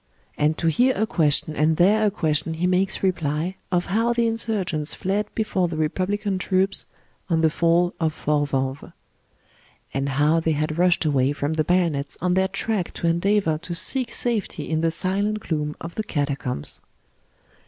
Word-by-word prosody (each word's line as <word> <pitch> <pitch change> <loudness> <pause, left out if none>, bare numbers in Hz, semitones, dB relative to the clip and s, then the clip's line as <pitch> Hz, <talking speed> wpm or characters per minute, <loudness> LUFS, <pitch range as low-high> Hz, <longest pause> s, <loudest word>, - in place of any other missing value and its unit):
And 150 +1 +1
to - - -3
here 245 - +3
a 220 - +2
question 155 -7 +1
and 155 +1 +2
there 210 +4 +4
a - - +4
question 160 -4 -1
he 170 +3 -1
makes 185 +2 +1
reply, 170 0 -1
of 175 -1 +1
how 230 +5 +1
the 235 0 +1
insurgents 205 -9 -1
fled 200 +3 -1
before 195 -5 0
the 165 -2 -5
Republican 190 +5 -1
troops, 190 +1 +2 0.4
on 165 -2 +2
the 160 -1 +3
fall 170 +2 +2
of 160 -2 +1
Fort 150 -1 0
Vanves. 135 +1 -3 1.0
And 135 +1 -1
how 150 +4 +2
they 160 -1 0
had 155 +2 -2
rushed 175 -2 +3
away 140 -2 +2
from 145 +1 -2
the 155 -1 +1
bayonets 165 -5 0
on 180 +1 +1
their 190 +1 +2
track 195 -1 -2
to - - -4
endeavour 170 -1 +1
to 175 +1 -6
seek 240 +7 -1
safety 235 -4 -1
in 160 -1 0
the 165 - +2
silent 200 +5 0
gloom 150 -4 -2
of 170 +1 -7
the 215 - -3
catacombs. 140 - -2
170 Hz, 175 wpm, -23 LUFS, 155-195 Hz, 1.0 s, there